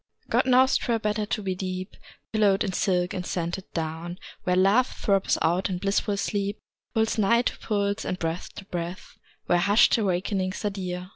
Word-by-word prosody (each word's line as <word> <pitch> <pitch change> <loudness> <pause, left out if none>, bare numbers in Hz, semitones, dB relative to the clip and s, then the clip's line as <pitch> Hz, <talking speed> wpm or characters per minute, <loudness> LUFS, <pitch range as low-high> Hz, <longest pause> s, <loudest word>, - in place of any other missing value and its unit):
God - - +3
knows 260 +1 +5
'twere 235 -3 0
better 210 -1 -1
to 210 - -2
be 190 -1 -1
deep 185 +1 -5 0.4
Pillowed 205 -3 +3
in 190 - -2
silk 180 -2 +1
and 180 - -3
scented 175 +1 -4
down, 165 +2 -4 0.3
Where 180 - +2
Love 200 +7 +4
throbs 195 -2 +1
out 175 +5 +1
in 185 - -2
blissful 200 +2 0
sleep, 200 0 -1 0.4
Pulse 220 0 +1
nigh 235 +4 +4
to - - -2
pulse, 205 -1 -1
and 180 - -2
breath 165 0 -3
to 200 - -9
breath, 175 -1 -6 0.3
Where 175 - +3
hushed 205 +5 +5
awakenings 190 0 -1
are 205 - +1
dear 180 -2 -5
195 Hz, 175 wpm, -26 LUFS, 180-210 Hz, 0.4 s, knows